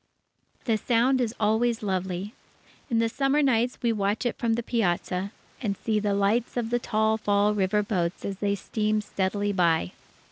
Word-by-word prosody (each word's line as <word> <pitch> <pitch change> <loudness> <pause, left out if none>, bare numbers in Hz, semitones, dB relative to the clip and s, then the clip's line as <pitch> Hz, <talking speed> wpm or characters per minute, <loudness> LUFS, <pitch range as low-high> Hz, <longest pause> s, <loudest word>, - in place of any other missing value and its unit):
The 225 -3 +2
Sound 250 +4 +2
is 235 -1 -1
always 220 +2 +1
lovely. 190 +1 -2 0.6
In 230 - +1
the 230 0 +3
summer 275 +5 +1
nights, 245 -2 +2
we 235 -1 +2
watch 205 +3 -1
it 240 - 0
from 230 -2 0
the 235 +1 -1
piazza, 190 -3 -1 0.3
and 200 -5 -2
see 220 -2 0
the 205 -1 0
lights 215 +5 +1
of 235 -1 -2
the 240 - +2
tall 220 -1 +1
Fall 205 0 +2
River 210 +1 +1
boats 180 -4 -2
as 195 -1 -4
they 200 -1 +1
steam 215 +2 -1
steadily 205 0 -1
by. 165 - +2
215 Hz, 175 wpm, -26 LUFS, 200-230 Hz, 0.6 s, the